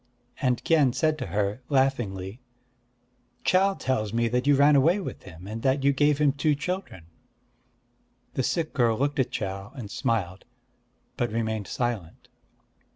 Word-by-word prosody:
And 125 -3 +1
Kien 150 -7 +3
said 155 +2 +1
to - - -4
her, 100 +5 -1
laughingly: 120 -7 0 1.0
"Chau 195 +1 +3
tells 110 - -1
me 115 0 +2
that 125 +3 0
you 145 - +6
ran 145 +2 +5
away 165 +8 +4
with 190 - -6
him, 90 -1 -12
and 110 +3 -6
that 135 +1 +1
you 140 0 +4
gave 145 +1 +3
him 150 -1 +3
two 145 +2 +1
children." 150 - -5 1.3
The - - 0
sick 160 +5 -1
girl 115 -4 +2
looked 140 +1 0
at 130 - +2
Chau, 95 +1 -4
and 110 -7 -7
smiled; 95 -5 -2 0.7
but 120 -2 -1
remained 110 -3 -2
silent. 115 -9 -4
125 Hz, 155 wpm, -26 LUFS, 105-145 Hz, 1.3 s, you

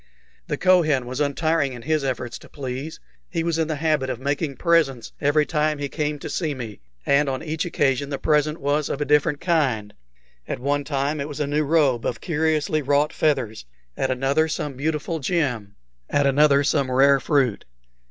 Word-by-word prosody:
The - - -2
Kohen 160 -9 +3
was 125 +2 -5
untiring 145 -1 +1
in 120 -2 -9
his 155 0 0
efforts 130 -3 -3
to - - -16
please. 135 +2 -6 0.3
He 165 -2 -2
was 165 -1 0
in 160 - +1
the 160 - -2
habit 150 -3 0
of 125 -2 -3
making 140 +1 -2
presents 155 -9 +1
every 150 +1 +3
time 150 -1 0
he 145 -1 -4
came 150 0 -2
to - - -7
see 155 -5 -2
me, 115 -5 -7 0.3
and 140 0 +3
on 130 +1 -3
each 160 +1 -2
occasion 140 -4 0
the 140 - -2
present 150 +1 +1
was 145 +1 0
of 140 - -3
a 145 - -1
different 150 +1 +2
kind; 135 - 0 0.5
at - - -3
one 145 +3 -1
time 145 +1 -1
it 140 - -3
was 145 -2 -7
a 150 - +1
new 145 +2 0
robe 145 -6 +2
of 115 - -3
curiously 155 -1 0
wrought 145 +2 +1
feathers, 125 - 0 0.3
at 135 - -1
another 135 +5 +1
some 150 -2 -3
beautiful 155 +4 -2
gem, 125 - -1 0.3
at 145 0 +2
another 140 +1 +4
some 140 -2 +1
rare 135 +2 +5
fruit. 130 -5 +1
145 Hz, 190 wpm, -23 LUFS, 135-155 Hz, 0.5 s, rare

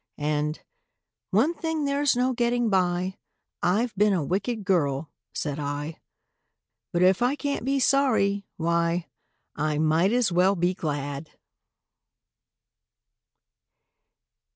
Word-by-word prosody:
And, 150 +1 -1 0.7
"One 235 - +3
thing 320 -3 -2
there's 280 -1 +2
no 250 +1 +1
getting 240 -1 +1
by— 185 0 +1 0.4
I've 220 +6 +1
been 205 +1 +3
a 175 -5 0
wicked 200 - -2
girl," 150 -5 0 0.2
said 145 -1 -3
I; 145 +2 -4 0.9
"But 175 +1 +2
if 190 +4 +4
I 250 +3 +2
can't 285 -3 -3
be 275 +2 +1
sorry, 225 -8 +2
why, 170 +1 0 0.5
I 150 0 -1
might 160 +5 +3
as 240 -4 +2
well 185 +3 +3
be 175 +1 +1
glad!" 145 -3 -4
185 Hz, 110 wpm, -26 LUFS, 160-240 Hz, 0.9 s, if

